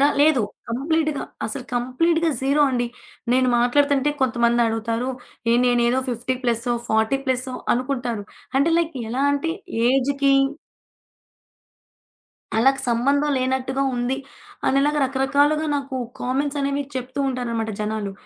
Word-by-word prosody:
దా 280 Hz, -, +6 dB
లేదు. 295 Hz, -3 st, +5 dB, 0.3 s
కంప్లీట్‌గా 305 Hz, +4 st, 0 dB, 0.2 s
అసలు 250 Hz, +4 st, -5 dB
కంప్లీట్‌గా 325 Hz, +7 st, +1 dB
జీరో 280 Hz, +3 st, +3 dB
అండి. 245 Hz, -1 st, 0 dB, 0.5 s
నేను 255 Hz, 0 st, +3 dB
మాట్లాడుతుంటే 280 Hz, +3 st, +3 dB
కొంతమందడుగుతారు, 235 Hz, -1 st, +1 dB, 0.4 s
ఏహ్! 240 Hz, -, +4 dB
నేనేదో 245 Hz, +1 st, +3 dB
50 245 Hz, +2 st, -2 dB
ప్లసో, 240 Hz, 0 st, 0 dB
40 220 Hz, +5 st, +2 dB
ప్లసో 255 Hz, 0 st, -1 dB, 0.2 s
అనుకుంటారు. 245 Hz, -4 st, -2 dB, 0.3 s
అంటే 320 Hz, +4 st, +3 dB
లైక్ 335 Hz, -2 st, -1 dB, 0.2 s
ఎలా 260 Hz, +3 st, -1 dB
అంటే, 285 Hz, +3 st, -1 dB, 0.4 s
ఏజ్‌కి 275 Hz, +1 st, +2 dB, 2.2 s
అళ్ళకి 270 Hz, +5 st, +3 dB
సంబంధం 280 Hz, +5 st, +2 dB
లేనట్టుగా 260 Hz, +1 st, -1 dB
ఉంది. 245 Hz, +2 st, -1 dB, 0.5 s
అనిలాగా 290 Hz, +2 st, +2 dB
రకరకాలుగా 285 Hz, +3 st, +2 dB
నాకు 275 Hz, -2 st, -4 dB, 0.2 s
కామెంట్సనేవి 280 Hz, +2 st, -1 dB
చెప్తూ 255 Hz, +1 st, -5 dB
ఉంటారనమాట 235 Hz, -3 st, -2 dB
జనాలు. 210 Hz, -2 st, -2 dB
260 Hz, 110 wpm, -22 LUFS, 240-280 Hz, 2.2 s, దా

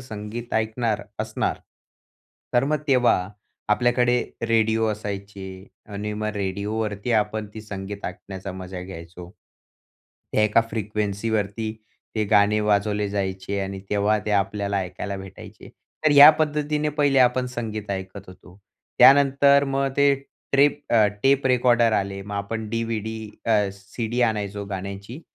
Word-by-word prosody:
संगीत 115 Hz, 0 st, -7 dB
ऐकणार 110 Hz, 0 st, 0 dB, 0.2 s
असणार. -, -, -2 dB, 1.0 s
तर 120 Hz, +2 st, +4 dB
मग 150 Hz, +1 st, 0 dB
तेव्हा 120 Hz, -8 st, +3 dB, 0.4 s
आपल्याकडे 120 Hz, +2 st, +2 dB, 0.2 s
रेडिओ 115 Hz, -1 st, +2 dB
असायचे 100 Hz, -2 st, -7 dB, 0.2 s
आणि 105 Hz, +1 st, -4 dB
मग 105 Hz, +1 st, -3 dB
रेडिओवरती 105 Hz, +3 st, -2 dB
आपण 105 Hz, -1 st, 0 dB
ते 110 Hz, -, -6 dB
संगीत 100 Hz, -1 st, -7 dB
ऐकण्याचा 95 Hz, +1 st, -6 dB
मजा 95 Hz, 0 st, -7 dB
घ्यायचो. 85 Hz, -1 st, -10 dB, 1.0 s
त्या 105 Hz, -, +3 dB
एका 105 Hz, +2 st, +4 dB
फ्रिक्वेन्सीवरती 105 Hz, 0 st, -2 dB, 0.4 s
ते 110 Hz, -, 0 dB
गाणे 105 Hz, 0 st, +4 dB
वाजवले 105 Hz, 0 st, +1 dB
जायचे 95 Hz, 0 st, -3 dB
आणि 95 Hz, 0 st, -4 dB
तेव्हा 105 Hz, +1 st, +2 dB
ते 105 Hz, -, -2 dB
आपल्याला 100 Hz, 0 st, 0 dB
ऐकायला 100 Hz, +2 st, -5 dB
भेटायचे. 95 Hz, -1 st, -11 dB, 0.4 s
तर 155 Hz, -, +5 dB
ह्या 145 Hz, +1 st, +11 dB
पद्धतीने 150 Hz, 0 st, 0 dB
पहिले 145 Hz, -2 st, +2 dB
आपण 125 Hz, 0 st, +3 dB
संगीत 110 Hz, -4 st, -5 dB
ऐकत 95 Hz, 0 st, -5 dB
होतो. 90 Hz, 0 st, -15 dB, 0.4 s
त्यानंतर 140 Hz, 0 st, +6 dB
मग 135 Hz, 0 st, 0 dB
ते 140 Hz, 0 st, +5 dB, 0.4 s
ट्रेप 145 Hz, +1 st, +4 dB
अ, 110 Hz, -3 st, +6 dB, 0.2 s
टेप 135 Hz, 0 st, +3 dB
रेकॉर्डर 120 Hz, -2 st, +3 dB
आले 100 Hz, -1 st, -1 dB
मग 100 Hz, +1 st, -7 dB
आपण 110 Hz, +2 st, -4 dB
डी-व्ही-डी 110 Hz, -1 st, -3 dB, 0.2 s
अ, 115 Hz, -, +3 dB, 0.2 s
सी-डी 110 Hz, +5 st, -4 dB
आणायचो 105 Hz, -3 st, -1 dB
गाण्याची, 100 Hz, -, -6 dB
105 Hz, 130 wpm, -24 LUFS, 100-120 Hz, 1.0 s, ह्या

